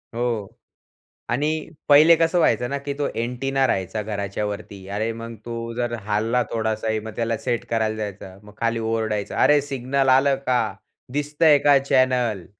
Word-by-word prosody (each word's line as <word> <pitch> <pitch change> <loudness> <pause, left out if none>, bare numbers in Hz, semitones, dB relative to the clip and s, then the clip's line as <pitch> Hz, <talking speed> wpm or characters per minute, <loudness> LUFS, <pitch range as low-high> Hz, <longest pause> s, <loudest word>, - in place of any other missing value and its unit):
हो 115 -4 -2 0.8
आणि 140 +6 +1 0.4
पहिले 155 +4 +8
कसं 165 +2 +1
व्हायचं 120 -5 +2
ना 140 - -2
की 140 - -2
तो 145 +1 -2 0.2
अँटेना 135 +3 0
राहायचा 95 +1 -1
घराच्या 100 -1 -3
वरती. 100 -2 -7
अरे, 105 +3 -2
मग 115 0 -8
तो 115 0 -5
जर 120 0 -2
हलला 110 +4 +1
थोडासाही, 110 -1 -1
मग 110 +1 -8
त्याला 115 -1 -1
सेट 120 +1 -2
करायला 110 -1 0
जायचा. 100 -3 -6
मग 105 0 -15
खाली 115 0 0
ओरडायचा, 110 -2 -2
"अरे 150 0 +5
सिग्नल 135 -1 -1
आलं 135 0 +3
का? 125 -1 +3 0.5
दिसतंय 150 +1 +3
का 145 -1 +5
चॅनेल?" 125 -7 +1
115 Hz, 155 wpm, -23 LUFS, 110-135 Hz, 0.8 s, पहिले